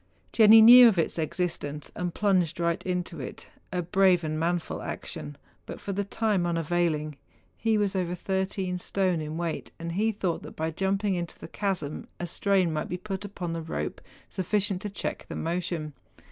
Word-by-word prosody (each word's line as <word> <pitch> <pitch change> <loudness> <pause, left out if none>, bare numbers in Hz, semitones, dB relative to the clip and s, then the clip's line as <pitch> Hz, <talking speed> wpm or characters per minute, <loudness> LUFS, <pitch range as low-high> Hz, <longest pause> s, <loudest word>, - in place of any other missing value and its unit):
Jenni 220 0 +8
knew 245 +2 +11
of 215 -5 +3
its 165 - 0
exist¬ 170 +2 -1
ence, 145 +1 -6
and 175 -1 -2
plunged 185 -5 +1
right 170 -1 0
into 180 -2 -2
it 130 - -8
— - - -39
a 180 -1 -1
brave 185 0 +3
and 155 0 -2
manful 170 +1 -1
action, 75 -1 -6 0.3
but - - -7
for 200 - -4
the 200 +1 -1
time 200 -3 0
unavailing. 165 -3 0 0.4
He 225 -1 +1
was 205 -2 0
over 180 -1 -1
thirteen 190 0 -2
stone 185 -3 0
in 155 +1 -5
weight, 170 -2 -3
and 170 0 -5
he 215 +6 +1
thought 190 -5 -2
that - - -10
by 160 +1 -2
jumping 195 +4 0
into 175 -2 -4
the - - -9
chasm 180 -6 -3
a 175 - -2
strain 185 -1 +1
might 155 - -3
be 180 - -2
put 195 +1 -5
upon 180 -4 -5
the 165 - -3
rope 160 - -4 0.3
sufficient 195 0 0
to 210 - -4
check 200 - -4
the - - -6
motion. 165 -2 -3
180 Hz, 190 wpm, -27 LUFS, 165-195 Hz, 0.4 s, knew